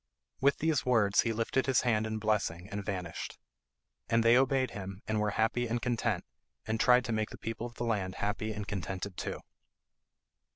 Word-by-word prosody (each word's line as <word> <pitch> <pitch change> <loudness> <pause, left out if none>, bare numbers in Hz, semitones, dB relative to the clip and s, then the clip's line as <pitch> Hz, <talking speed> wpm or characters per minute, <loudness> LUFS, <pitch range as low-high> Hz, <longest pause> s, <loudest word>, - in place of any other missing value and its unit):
With 140 +2 +3
these 160 -2 +1
words 110 -6 +4
he 115 - 0
lifted 115 +4 0
his 135 - +4
hand 110 -3 +1
in 110 0 -2
blessing 105 -5 0
and 100 0 -3
vanished. 90 -4 -4 0.7
And 115 0 +3
they 115 +1 +6
obeyed 130 0 +3
him, 95 -2 -7
and 110 0 0
were 105 0 +1
happy 115 +3 +1
and 120 +1 -1
content, 115 -6 -1 0.4
and 110 0 -1
tried 125 +1 +5
to - - -2
make 110 0 0
the - - -9
people 115 +1 -4
of 120 - -14
the - - -4
land 100 -5 -1
happy 110 +1 -2
and 105 -1 -5
contented 95 0 -4
too. - - -4
110 Hz, 190 wpm, -31 LUFS, 100-120 Hz, 0.7 s, they